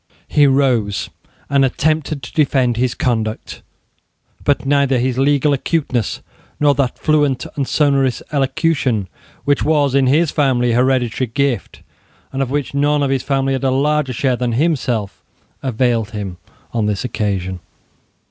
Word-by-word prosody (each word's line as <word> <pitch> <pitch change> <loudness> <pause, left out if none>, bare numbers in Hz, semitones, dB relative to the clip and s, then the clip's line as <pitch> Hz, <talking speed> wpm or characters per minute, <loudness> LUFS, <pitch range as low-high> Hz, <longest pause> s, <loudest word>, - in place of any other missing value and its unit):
He 145 -1 +4
rose, 125 -7 +1 0.4
and 140 -1 +3
attempted 150 +1 0
to 125 - -9
defend 130 -5 +2
his 125 +1 0
conduct: 110 -3 -2 0.8
but 145 -1 +1
neither 140 -1 +2
his 125 +1 0
legal 145 +1 +3
acuteness, 135 - -1 0.4
nor 145 -1 +4
that 135 -2 -1
fluent 145 -4 +1
and 140 -3 -2
sonorous 140 -4 +1
elocution 135 - 0 0.4
which 145 -1 +2
was 145 -3 +2
in 135 -1 +3
his 155 +4 +3
family 125 -5 +2
a - - +1
hereditary 130 -1 +1
gift, 125 -2 -2 0.5
and 135 - -1
of 135 - -1
which 145 0 -2
none 145 +1 +2
of 135 - 0
his 135 -2 +1
family 135 0 0
had 135 - -2
a 135 - +2
larger 145 +1 +1
share 130 +1 0
than 120 -1 -2
himself, 125 -7 -1 0.4
availed 120 -4 0
him 100 -5 -6 0.4
on 110 -3 0
this 105 +3 -2
occasion. 95 -6 -2
135 Hz, 150 wpm, -18 LUFS, 120-145 Hz, 0.8 s, He